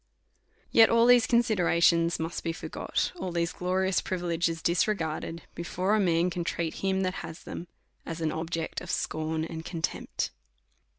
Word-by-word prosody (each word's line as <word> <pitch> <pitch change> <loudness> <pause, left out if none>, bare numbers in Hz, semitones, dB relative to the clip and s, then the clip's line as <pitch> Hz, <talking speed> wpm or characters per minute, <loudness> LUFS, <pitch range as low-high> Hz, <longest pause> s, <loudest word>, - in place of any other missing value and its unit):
Yet 225 -1 +7
all 230 0 +5
these 245 -1 +6
considerations 170 -7 +3
must 165 +1 -4
be 165 - -1
for - - -7
got, - - -1
all 185 - -4
these 170 0 -1
glorious 185 +1 +1
privileges 170 -3 -1
disregarded, 170 -2 0
before 185 +5 0
man 175 -2 +2
can 175 0 -2
treat 170 -1 -2
him 190 0 +1
that 185 -1 0
has 165 0 -9
them, 175 - -7 0.4
as 165 0 -6
an 160 -2 0
object 165 0 -3
of - - -9
scorn 155 0 -1
and 160 0 -6
contemi>t. 165 -1 -3
170 Hz, 155 wpm, -28 LUFS, 165-190 Hz, 0.4 s, Yet